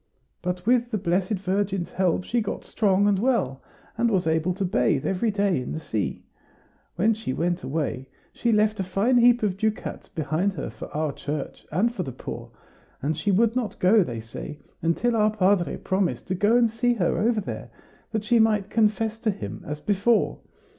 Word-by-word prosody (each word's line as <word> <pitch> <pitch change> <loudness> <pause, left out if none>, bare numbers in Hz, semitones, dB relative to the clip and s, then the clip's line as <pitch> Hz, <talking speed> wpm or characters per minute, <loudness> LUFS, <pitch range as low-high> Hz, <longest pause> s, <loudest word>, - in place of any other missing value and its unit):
But 180 0 -3
with 240 0 +3
the 220 - -1
Blessed 185 +2 0
Virgin's 195 -1 -1
help 185 -1 +1
she 235 +5 0
got 210 - -4
strong 200 -2 +2
and 200 -2 +3
well, 205 - +1 0.4
and 235 0 +3
was 190 -6 +1
able 160 +2 +1
to 195 0 -1
bathe 175 -7 +1
every 195 +4 +1
day 200 -7 +1
in 125 - -5
the 160 - -3
sea. 110 -9 -3 0.7
When 215 +6 +3
she 220 -11 -4
went 175 +4 -1
away, 135 -2 -3 0.3
she 235 - 0
left 215 0 +2
a - - +1
fine 200 +7 +2
heap 240 -1 +5
of 195 -3 0
ducats 215 +1 -2
behind 165 +3 -1
her 155 - -5
for - - -8
our 155 -1 -2
church, 145 0 -5
and 215 +9 +1
for 200 - -3
the 135 - -4
poor; 125 - -7 0.5
and 155 +3 0
she 155 +6 -2
would 225 +4 +3
not 230 -6 -2
go, 195 +3 +5
they 120 -7 -5
say, 115 +6 -8 0.2
until 200 +9 +1
our 215 -1 +4
padre 200 -4 +2
promised 190 -1 -1
to - - +1
go 205 +6 +3
and 235 -2 +3
see 240 +2 +1
her 180 -6 +1
over 225 0 +2
there, 195 - -6 0.4
that 220 -2 -1
she 235 +2 +3
might 210 -3 +2
confess 220 0 +1
to 225 - 0
him 105 - -5
as 150 0 -4
before. 205 +6 +1
195 Hz, 195 wpm, -25 LUFS, 170-220 Hz, 0.7 s, heap